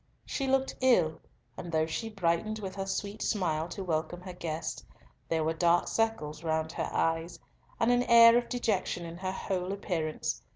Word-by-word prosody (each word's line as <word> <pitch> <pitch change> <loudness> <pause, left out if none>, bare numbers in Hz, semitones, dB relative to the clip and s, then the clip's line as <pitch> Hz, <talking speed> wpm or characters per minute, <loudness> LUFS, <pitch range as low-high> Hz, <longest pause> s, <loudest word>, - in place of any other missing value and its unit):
She 275 - -2
looked 265 0 +1
ill, 180 -12 +3 0.4
and 170 - -6
though 160 -1 +2
she 225 +8 -4
brightened 200 +2 0
with 195 -3 -5
her 195 -1 -4
sweet 200 +2 -3
smile 165 -6 0
to 190 +3 -6
welcome 175 0 -2
her 185 0 -8
guest, 165 -2 -4 0.5
there 160 -1 +1
were 160 +1 +1
dark 170 +1 +3
circles 170 -9 -1
round 160 -1 -1
her - - -3
eyes, 165 +1 0 0.4
and 230 +1 +3
an 245 0 +4
air 230 -1 +8
of 240 0 +1
dejection 205 -7 -1
in 165 0 -7
her 185 +1 -3
whole 185 -1 -3
appearance. 165 - -2
180 Hz, 175 wpm, -30 LUFS, 165-215 Hz, 0.5 s, air